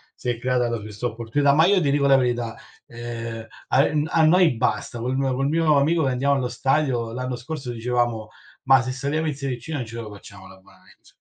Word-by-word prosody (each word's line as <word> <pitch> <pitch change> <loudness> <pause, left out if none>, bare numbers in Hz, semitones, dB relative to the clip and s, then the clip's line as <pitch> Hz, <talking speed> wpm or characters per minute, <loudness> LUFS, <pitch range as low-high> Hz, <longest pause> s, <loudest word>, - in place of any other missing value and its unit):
si 125 - -5
è 120 - -1
creata 125 -1 +1
poi 115 -2 -3
questa 105 +2 -7
opportunità, 120 +5 +1
ma 160 +3 +5
io 195 0 +4
ti 145 -5 +1
dico 140 0 +2
la 135 -1 +6
verità, 120 -2 -1 0.3
ehm, 115 -1 -6 0.2
ai 140 +3 +3
n 150 +1 +1
a 160 0 +3
noi 175 +1 +5
basta, 120 0 -1
col 125 +3 -2
mio 135 -1 0
col 135 +2 0
mio 155 -1 +3
amico 160 +3 +2
che 135 - +1
andiamo 135 +3 +1
allo 130 -2 -1
stadio, 125 -2 0
l'anno 125 +1 -3
scorso 135 -1 -6
dicevamo: 120 -1 -1 0.4
"Ma 135 0 +5
se 130 - -4
saliamo 145 +4 -2
in 150 - -2
serie 135 -3 -4
C - - -13
non 145 -6 -3
ce 115 +1 -10
lo 110 - -9
facciamo 100 -1 -13
l'abbonamento!", 95 0 -20
130 Hz, 220 wpm, -23 LUFS, 120-145 Hz, 0.4 s, la